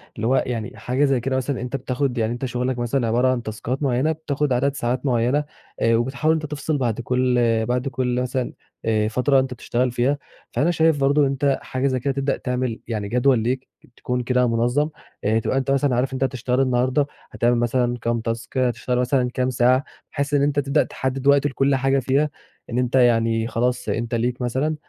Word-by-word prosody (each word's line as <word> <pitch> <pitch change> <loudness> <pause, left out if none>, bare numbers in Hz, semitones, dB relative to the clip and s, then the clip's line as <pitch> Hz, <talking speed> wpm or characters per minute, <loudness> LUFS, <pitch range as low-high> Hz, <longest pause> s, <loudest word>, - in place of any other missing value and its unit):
اللي 110 - -2
هو 130 - +3
يعني 115 -3 -4
حاجة 125 +6 +1
زي 135 -2 +2
كده 130 +2 -2
مثلًا 130 0 -2
أنت 125 +2 -4
بتاخد 130 -1 -2
يعني 115 0 0
أنت 120 +2 -4
شغلك 125 0 -2
مثلًا 120 +1 0
عبارة 120 +3 +2
عن 130 -2 0
تاسكات 120 +5 -4
معيّنة 135 +3 +2
بتاخد 150 -3 -1
عدد 140 +3 +1
ساعات 125 +1 -2
معيّنة 125 +3 +2 0.4
آآ، 115 0 +4
وبتحاول 130 +7 +1
أنت 155 -1 -2
تفصل 150 +1 -2
بعد 120 -4 -1
كل 125 0 +1 0.3
بعد 125 +3 -1
كل 125 -2 -1
مثلًا 125 0 -2 0.3
آآ 110 -1 +2
فترة 125 +5 +2
أنت 130 -1 -1
بتشتغل 125 +1 -1
فيها، 125 +4 +1 0.3
فأنا 145 +8 +1
شايف 160 -3 +2
برضه 140 +2 +3
ان - - +5
أنت 140 0 +1
حاجة 130 +1 -1
زي 130 -1 0
كده 135 +2 -1
تبدأ 135 0 -1
تعمل 125 -2 -2
يعني 110 -3 -3
جدول 125 +2 +3
ليك 130 +4 -2 0.3
تكون 125 0 -2
كده 125 0 +2
منظّم، 120 +6 +1 0.3
آآ 110 +2 +2
تبقى 120 - -1
أنت 135 0 0
مثلًا 140 -2 +2
عارف 130 +2 0
أنت 130 0 -1
هتشتغل 130 -1 0
النهارده 130 +2 +1 0.2
هتعمل 120 +1 +2
مثلًا 120 +1 +1
كام 115 0 0
تاسك 115 +2 -4
هتشتغل 125 0 0
مثلًا 125 0 +1
كام 130 0 0
ساعة، 125 +2 +3 0.3
بحيث 140 0 -2
إن 145 - +4
أنت 145 0 +2
تبدأ 140 +1 +2
تحدِّد 130 +1 -3
وقت 140 0 +5
لكل 135 0 +1
حاجة 135 +1 +2
فيها، 135 +4 +1 0.4
إن 120 - -3
أنت 125 0 0
يعني 115 -2 +3
خلاص 125 +1 -1
أنت 120 +1 -1
ليك 120 +2 -1
مثلًا 130 +6 0
125 Hz, 200 wpm, -22 LUFS, 120-135 Hz, 0.4 s, ان